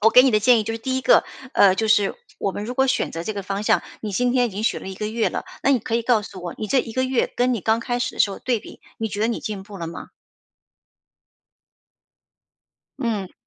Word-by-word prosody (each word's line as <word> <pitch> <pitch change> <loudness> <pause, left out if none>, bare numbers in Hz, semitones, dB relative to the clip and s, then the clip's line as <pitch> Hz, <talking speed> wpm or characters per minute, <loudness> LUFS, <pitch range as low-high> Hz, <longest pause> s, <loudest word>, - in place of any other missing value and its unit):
我 225 +2 +5
给 250 +3 +8
你 265 - +4
的 215 - +4
建 245 +2 +5
议 215 - -1
就 225 +1 -3
是 - - -5
第 260 +3 -1
一 - - -2
个， 255 0 +5 0.3
呃， 190 -2 +6
就 220 +2 0
是 210 - +3 0.2
我 195 - 0
们 205 +2 -5
如 245 +3 -5
果 265 +1 +3
选 - - 0
择 165 - -4
这 215 - -3
个 200 - -4
方 195 +1 -3
向， - - +3 0.2
你 215 - -4
今 245 +5 +1
天 250 -1 +3
已 - - -3
经 205 +2 -4
学 - - +1
了 - - -7
1 190 - -6
个 210 - -3
月 225 +1 0
了， - - -4 0.2
那 275 - +3
你 265 - +4
可 225 - -4
以 235 - +1
告 230 -3 +3
诉 190 -3 -10
我， 175 - -5
你 215 - -3
这 260 +3 +3
1 - - -7
个 260 +2 +1
月 260 -2 0
跟 250 0 +2
你 220 - -3
刚 220 +3 +2
开 245 +1 -2
始 - - -2
的 - - -3
时 200 - +4
候 - - -7
对 245 -3 0
比， - - -13 0.2
你 225 - -1
觉 205 0 -5
得 220 - +2
你 235 - -1
进 205 -3 -5
步 200 -1 -11
了 165 - -4
吗？ 165 - -8 2.9
嗯。 215 -7 -2
220 Hz, 285 characters per minute, -23 LUFS, 205-245 Hz, 2.9 s, 给